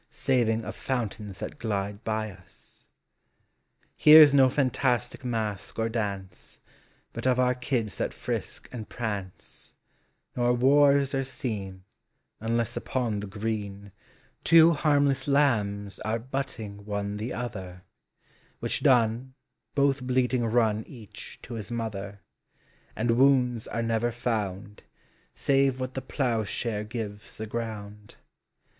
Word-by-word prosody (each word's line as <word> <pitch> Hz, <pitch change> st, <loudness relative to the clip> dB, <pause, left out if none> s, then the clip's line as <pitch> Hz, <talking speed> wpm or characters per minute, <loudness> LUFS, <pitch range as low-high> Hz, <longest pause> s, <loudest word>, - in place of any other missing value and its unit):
Saving 120 Hz, -5 st, +1 dB
of -, -, -6 dB
fountains 110 Hz, -6 st, -3 dB
thai -, -, -4 dB
glide 105 Hz, -1 st, -4 dB
by 110 Hz, -1 st, -2 dB
as. 90 Hz, -3 st, -15 dB, 1.1 s
Here's 150 Hz, -1 st, +9 dB
no 135 Hz, -2 st, +6 dB
fantastic 130 Hz, -3 st, 0 dB
mask 110 Hz, -5 st, -3 dB
or 115 Hz, 0 st, 0 dB
dance, 100 Hz, -5 st, -5 dB, 0.5 s
But -, -, -3 dB
of 125 Hz, -1 st, +3 dB
our 125 Hz, 0 st, +3 dB
kids 120 Hz, -7 st, -2 dB
thai -, -, 0 dB
frisk -, -, -5 dB
and 115 Hz, -4 st, -7 dB
prance; 100 Hz, -6 st, -6 dB, 0.6 s
Nor 120 Hz, 0 st, +2 dB
wars 140 Hz, +2 st, +4 dB
are 135 Hz, 0 st, +1 dB
seen, 100 Hz, -8 st, -5 dB, 0.6 s
Unless 115 Hz, +1 st, -1 dB
upon 120 Hz, -5 st, -2 dB
the 105 Hz, -, -5 dB
green 100 Hz, -1 st, -4 dB, 0.5 s
Two 165 Hz, +1 st, +7 dB
harmless 145 Hz, -3 st, +2 dB
lambs 105 Hz, -8 st, +1 dB
are 110 Hz, +1 st, -1 dB
butting 115 Hz, -5 st, -5 dB
one 100 Hz, 0 st, -3 dB
the 110 Hz, +4 st, -4 dB
other, 95 Hz, -6 st, -6 dB, 0.8 s
Which -, -, 0 dB
done, 120 Hz, +1 st, +2 dB, 0.4 s
both 140 Hz, -1 st, +2 dB
bleating 125 Hz, -1 st, +1 dB
run, 110 Hz, -2 st, +2 dB
each 115 Hz, -7 st, -10 dB
to 120 Hz, -, -8 dB
his 110 Hz, -2 st, -6 dB
mother 105 Hz, -4 st, -5 dB, 0.4 s
j -, -, -37 dB, 0.3 s
And 120 Hz, -, +1 dB
wounds 125 Hz, -4 st, +3 dB
are 115 Hz, -, -2 dB
never 115 Hz, +1 st, 0 dB
found. 105 Hz, -4 st, -3 dB, 0.5 s
Save 135 Hz, -1 st, +2 dB
what 130 Hz, 0 st, -4 dB
the 130 Hz, -, -3 dB
ploughshare 115 Hz, -4 st, -1 dB
gives 105 Hz, -2 st, -6 dB
the 110 Hz, -, -4 dB
ground. 105 Hz, -2 st, -6 dB
115 Hz, 125 wpm, -27 LUFS, 105-130 Hz, 1.1 s, Here's